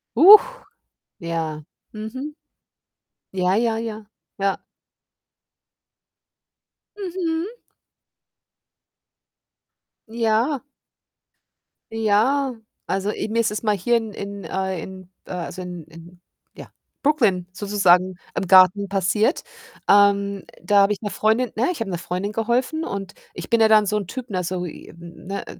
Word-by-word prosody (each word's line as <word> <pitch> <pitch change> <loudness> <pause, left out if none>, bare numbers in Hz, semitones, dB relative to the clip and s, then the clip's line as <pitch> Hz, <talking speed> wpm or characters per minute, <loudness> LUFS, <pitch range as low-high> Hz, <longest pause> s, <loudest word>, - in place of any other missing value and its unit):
Huch, 425 - +7 0.6
ja. 165 -2 -3 0.3
Mhm. 260 +8 -6 1.0
Ja, 185 0 +1
ja, 230 -1 +1
ja. 220 -2 -5 0.3
Ja. 195 -1 0 2.4
Mhm. 365 +2 -3 2.5
Ja. 230 +4 0 1.3
Ja, 225 +5 +1 0.3
also, 195 +2 -1
i 215 - -4
mir 230 - 0
ist 225 - 0
es 210 - -4
mal 210 -1 +2
hier 235 +6 +1
in 225 -2 -5
in 200 -1 -7
äh, 190 -2 -3
in 185 0 -10 0.2
äh, - - -11
also 180 +1 -5
in 180 -3 -8
in, 165 +2 -15 0.3
ja, - - -11 0.3
Brooklyn 220 - +2
sozusagen 185 -2 +2 0.2
im - - -1
Garten 190 +2 +6
passiert. 200 - +1 0.4
Ähm, 200 -1 +3 0.2
da 200 +3 +3
habe 200 +1 +3
ich 205 - -8
'ner 205 - -3
Freundin 220 +2 +1
ne, 245 +9 +1
ich 335 - -6
habe 225 - -3
'ner 175 - -2
Freundin 185 +4 -4
geholfen, 245 +8 0
und 195 - -5 0.2
ich - - -8
bin 230 -1 +3
ja 220 - +7
dann 215 -1 +5
so 210 - -1
'n 200 - -3
Typ, 255 +2 -7
ne, 185 -2 -2
so, 180 +1 -3
i 170 - -9
hm, 170 +1 -13
ne, 200 +1 -4
205 Hz, 130 wpm, -22 LUFS, 185-230 Hz, 2.5 s, Huch